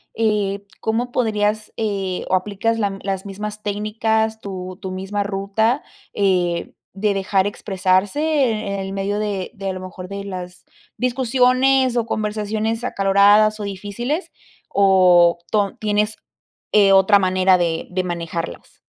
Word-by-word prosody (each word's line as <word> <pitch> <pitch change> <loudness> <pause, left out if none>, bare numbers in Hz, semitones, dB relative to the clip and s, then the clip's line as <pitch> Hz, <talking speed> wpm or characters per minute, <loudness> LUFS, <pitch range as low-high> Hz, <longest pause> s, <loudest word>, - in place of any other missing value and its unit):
eh, 205 -3 0 0.2
¿cómo 235 +3 -1
podrías, 215 -2 0
eh, 195 -4 -2
o - - +3
aplicas 210 +4 -1
la 210 -3 +1
m 195 0 -6
las 195 -1 -3
mismas 210 +2 -6
técnicas, 220 +1 0
tu 185 -2 -6
tu 190 -2 -5
misma 195 +2 -3
ruta, 200 +6 0 0.3
eh, 180 -4 0 0.2
de 205 +1 +1
dejar 195 0 +1
expresarse, 195 +5 0
eh, 245 -10 +1
en 195 - -3
el 195 0 -5
medio 200 +1 -2
de 205 -3 -2
de, 195 -1 -4
a - - -2
lo 185 - -6
mejor, 185 0 -8
de 200 +1 -6
las 180 -2 -8 0.3
discusiones 255 +1 +2
o 230 - +1
conversaciones 215 +1 -2
acaloradas 205 0 +4
o - - -4
difíciles? 205 - -4 0.4
O 180 -3 +5
ton 205 -2 0
¿tienes, 210 0 0 0.6
eh, 200 -2 +6
otra 195 +1 +6
manera 185 0 +3
de 165 -2 -1
de 185 0 -1
manejarlas? 170 -1 -5
200 Hz, 145 wpm, -20 LUFS, 190-220 Hz, 0.6 s, eh